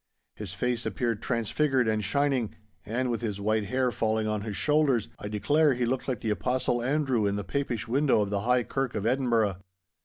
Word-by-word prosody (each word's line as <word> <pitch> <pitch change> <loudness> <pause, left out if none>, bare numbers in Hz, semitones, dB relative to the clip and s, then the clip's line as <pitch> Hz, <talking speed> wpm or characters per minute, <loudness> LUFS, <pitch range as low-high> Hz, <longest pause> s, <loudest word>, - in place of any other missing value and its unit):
His 105 -4 -6
face 125 +2 -1
appeared 115 -3 -1
transfigured 125 +2 +1
and 110 -1 +1
shining, 135 0 0 0.3
and, 125 +3 -1
with 115 - -2
his 105 -4 -3
white 110 +1 +1
hair 130 +2 0
falling 110 -1 0
on 105 -1 -1
his 105 -2 -4
shoulders, 145 -7 +2
I - - -5
declare 145 +7 +2
he 125 0 0
looked 130 +2 -2
like 125 -5 -2
the 110 - -1
Apostle 125 +2 0
Andrew 130 -4 +1
in 100 - 0
the 100 - -3
Papish 120 -4 -2
window 135 -1 +3
of 100 -1 -2
the 100 - 0
High 125 +3 +2
Kirk 135 +1 -2
of 105 -1 -2
Edinburgh. 115 -6 +2
120 Hz, 195 wpm, -28 LUFS, 110-130 Hz, 0.3 s, window